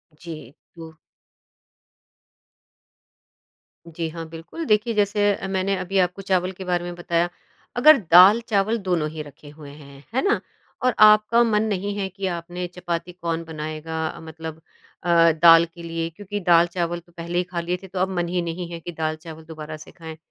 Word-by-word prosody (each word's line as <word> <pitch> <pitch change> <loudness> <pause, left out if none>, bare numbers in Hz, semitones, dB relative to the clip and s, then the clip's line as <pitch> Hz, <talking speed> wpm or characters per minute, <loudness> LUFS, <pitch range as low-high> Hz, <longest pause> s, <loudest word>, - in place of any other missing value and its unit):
जी, 155 -6 -10 0.2
तो 165 -1 -10 2.9
जी 165 0 -4
हाँ, 165 0 -7
बिल्कुल। 165 - -7
देखिए 215 +1 +2
जैसे 205 0 +2
अ, 195 - -6
मैंने 190 +1 0
अभी 195 +2 -3
आपको 180 +2 0
चावल 185 -1 0
के 190 0 -9
बारे 175 -1 0
में 175 0 -6
बताया। 175 0 0 0.5
अगर 300 +5 +7
दाल-चावल 205 +4 +6
दोनों 175 -6 -1
ही 155 0 -7
रखे 145 0 -14
हुए 150 -1 -12
हैं, 140 -1 -14
है 265 - +2
ना 415 - +2 0.5
और 250 - +3
आपका 215 +2 +6
मन 215 -2 +2
नहीं 200 0 -2
है 195 -1 -1
कि 195 +1 -6
आपने 175 +1 -4
चपाती 175 0 -4
कौन 170 -2 -4
बनाएगा, 160 0 -5
मतलब 160 0 -9 0.4
अ, 170 -1 +5
दाल 165 +1 +7
के 170 0 -14
लिए 165 0 -3
क्योंकि 205 +4 -6
दाल 170 0 +5
चावल 175 -1 -2
तो 175 +1 -23
पहले 170 +1 -4
ही 180 - +2
खा 180 -1 -5
लिए 175 +1 -2
थे - - -9
तो 185 0 -5
अब 190 +1 +1
मन 175 0 0
ही 180 0 -1
नहीं 170 +1 -4
है 170 - -6
कि 175 - -7
दाल-चावल 160 0 -5
दोबारा 155 -1 -8
से 155 - -13
खाएँ। 160 -2 -10
175 Hz, 175 wpm, -23 LUFS, 165-190 Hz, 2.9 s, अगर